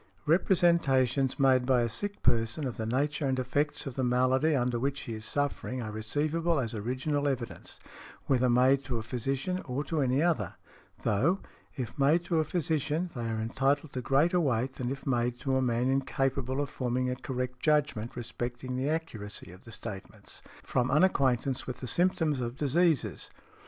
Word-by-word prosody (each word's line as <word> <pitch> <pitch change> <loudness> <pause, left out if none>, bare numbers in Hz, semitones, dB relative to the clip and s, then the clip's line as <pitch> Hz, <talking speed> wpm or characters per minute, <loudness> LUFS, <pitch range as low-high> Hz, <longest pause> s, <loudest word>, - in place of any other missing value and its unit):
Representations 145 -7 +3
made 130 -2 +4
by 125 -2 +4
a - - +1
sick 205 - -4
person 115 +5 +1
of 125 - -4
the 110 - -3
nature 145 +4 0
and 130 -1 0
effects 145 +4 0
of 135 - -5
the 130 - -1
malady 130 +5 +3
under 125 -2 0
which 140 +2 -1
he 115 - -5
is 110 0 -6
suffering 140 0 -2
are 110 -3 -4
receivable 150 +9 0
as 115 -4 -2
original 130 +7 -1
evidence, 130 -4 -4 0.5
whether 130 -2 +2
made 130 +3 +4
to 125 -4 -2
a 110 - -4
physician 135 +9 -2
or 135 +2 -2
to 150 +1 -1
any 130 +3 +2
other; 155 - 0 0.5
though, 135 - +2 0.4
if 130 0 -5
made 155 +5 +3
to 170 -2 +1
a - - +3
physician, 160 +1 -1
they 115 -2 -3
are 110 -1 -2
entitled 135 +6 0
to 130 - -3
greater 150 +8 +3
weight 130 -4 0
than 125 -2 -3
if 135 +1 -5
made 120 -2 0
to 135 -1 0
a 130 - +2
man 120 0 +1
incapable 135 0 0
of 145 - -3
forming 125 0 -1
a 125 - -1
correct 125 -1 -4
judgment 145 -7 +1
respecting 120 +1 -5
the 130 +3 -1
accuracy 115 - -4
of 90 +2 -15
the 120 - -11
statements, 105 -3 -8 0.2
from 125 0 0
unacquaintance 135 -5 +2
with 125 - -4
the - - -5
symptoms 160 -2 +1
of 120 +1 -4
diseases. 155 +1 +1
130 Hz, 175 wpm, -29 LUFS, 120-150 Hz, 0.5 s, made